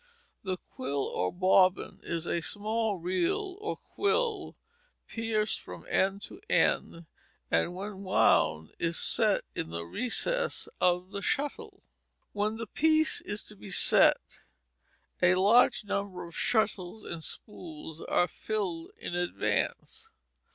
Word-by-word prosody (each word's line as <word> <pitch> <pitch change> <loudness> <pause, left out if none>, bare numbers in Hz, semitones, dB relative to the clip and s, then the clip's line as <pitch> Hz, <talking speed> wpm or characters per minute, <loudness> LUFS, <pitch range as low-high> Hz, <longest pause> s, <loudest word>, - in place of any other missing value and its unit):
The 185 -2 -2
quill 140 -3 -4
or 90 - -1
bobbin 185 0 +3
is 170 -1 -4
a 170 - -1
small 215 +3 -1
reed 185 - 0
or 405 +1 -3
quill, 435 -1 -1 0.5
pierced 225 -2 -1
from 90 -2 -10
end 195 +1 +1
to 395 - -10
end, 170 0 +1 0.5
and 125 - +1
when 195 +1 -6
wound 80 - +3
is 165 0 0
set - - +2
in - - -4
the 85 0 -5
recess 250 - -1
of 180 +1 +2
the 200 - -4
shuttle. 290 +6 -2 0.5
When 210 +2 -1
the 230 - -4
piece 315 +7 +2
is 205 +1 -4
to 210 - -12
be 200 - -11
set, 185 - +3 0.8
a 180 0 +5
large 210 +4 +5
number 200 -3 -3
of 170 - -11
shuttles 215 -3 0
and 165 -2 -5
spools 160 -6 -5
are 175 - +2
filled 185 -8 -3
in - - -6
advance. 175 - -2
195 Hz, 130 wpm, -30 LUFS, 170-225 Hz, 0.8 s, a